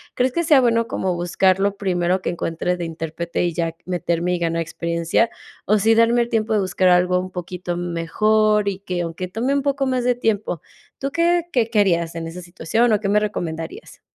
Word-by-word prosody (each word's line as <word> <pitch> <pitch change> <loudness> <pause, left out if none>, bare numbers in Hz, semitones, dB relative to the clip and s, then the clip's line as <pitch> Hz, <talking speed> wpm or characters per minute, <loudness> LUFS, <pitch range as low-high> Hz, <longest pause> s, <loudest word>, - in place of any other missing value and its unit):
crees 255 +1 +1
que 340 - 0
sea 295 -4 +5
bueno 230 -1 +2
como 185 -2 -2
buscar 180 +2 +2
lo 200 0 +1
primero 180 -1 0
que - - -2
encuentre 175 +1 -2
de 175 - -4
intérprete 165 +1 -3
y 175 - -1
ya 165 -1 -2
meterme 175 -1 -1
y - - -4
ganar 165 -1 0
experiencia, 170 +6 0 0.4
o 215 +1 +3
sí 225 +3 +4
darme 230 +1 +4
el 235 - -1
tiempo 225 -2 0
de 215 - +3
buscar 185 -1 +2
algo 180 0 +3
un 185 0 -5
poquito 180 0 -5
m 175 0 -4
mejor, 210 +5 +2
y 195 - -4
que 180 -3 -3
aunque 170 +2 -4
tome 235 +8 -1
un 280 - 0
poco 275 -1 0
más 255 -1 0
de 250 - +4
tiempo? 210 - -1 0.4
¿Tú 275 - -2
qué 340 +1 +2
qué 230 -3 +2
qué 220 - +2
harías 170 -4 +2
en 165 0 -4
esa 170 +2 -8
situación 190 +7 0
o 210 - +3
qué 200 - -1
me 210 +1 +4
recomendarías? 165 -6 -5
185 Hz, 215 wpm, -21 LUFS, 170-225 Hz, 0.4 s, sea